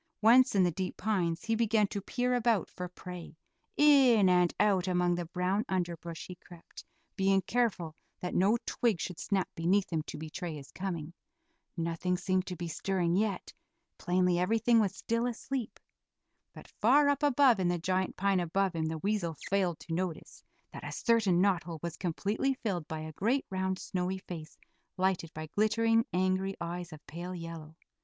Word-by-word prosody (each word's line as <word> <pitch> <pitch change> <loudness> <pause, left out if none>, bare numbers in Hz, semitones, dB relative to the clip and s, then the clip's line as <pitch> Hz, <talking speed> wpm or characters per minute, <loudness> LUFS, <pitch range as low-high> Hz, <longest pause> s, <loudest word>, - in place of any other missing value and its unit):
Once 240 +1 +6
in 190 - +5
the 175 - +2
deep 185 +3 -4
pines 180 -5 -1
he 225 - 0
began 225 -1 +3
to 200 0 -4
peer 250 +5 -1
about 235 -5 +1
for 180 - -5
prey; 180 -2 -9 0.4
in 265 -9 +6
and 180 -1 +4
out 195 -3 +3
among 180 -1 +2
the 175 -1 -3
brown 185 +4 0
underbrush 170 -3 -3
he 180 - -8
crept, 175 -1 -14 0.3
being 195 0 +3
careful 190 -8 -1 0.2
that 180 - -4
no 200 +6 +3
twig 225 -8 0
should 180 -1 -5
snap 195 -3 0
beneath 185 +3 +1
him 160 - +1
to 150 - -8
betray 160 +2 -5
his 140 -2 -10
coming. 170 -4 -5 0.6
Nothing 170 +2 -1
seemed 185 0 0
to 180 - -4
be 175 -1 -5
stirring 175 0 0
yet; 205 -1 -1 0.5
plainly 180 -1 +2
everything 225 +5 +3
was 205 -4 +1
still 230 +1 -1
asleep. 245 0 -4 0.7
But - - -13
far 280 +7 +4
up 285 -1 +2
above 275 -5 +4
in 185 - +1
the 175 0 +1
giant 185 +2 -1
pine 195 -1 +2
above 185 +2 0
him 160 -1 -1
the 160 0 -3
weasel 185 -2 -1 0.2
failed 185 -4 +1
to 165 - -6
notice 175 -1 -4 0.3
that - - -8
a - - -5
certain 220 -7 +2
knot 195 -3 +3
hole 165 -1 -7
was 170 -1 -4
completely 205 +9 -1
filled 180 -8 -2
by 160 -1 -5
a 155 0 -7
great, 240 - 0
round, 190 0 -1
snowy 185 0 -2
face 160 -5 -9 0.4
lighted 185 -3 0
by 155 0 -5
glittering, 225 - +2
angry 185 +1 0
eyes, 175 +1 -5
of 155 -1 -12
pale 175 +3 -6
yellow. 165 -2 -8
185 Hz, 175 wpm, -31 LUFS, 170-210 Hz, 0.7 s, Once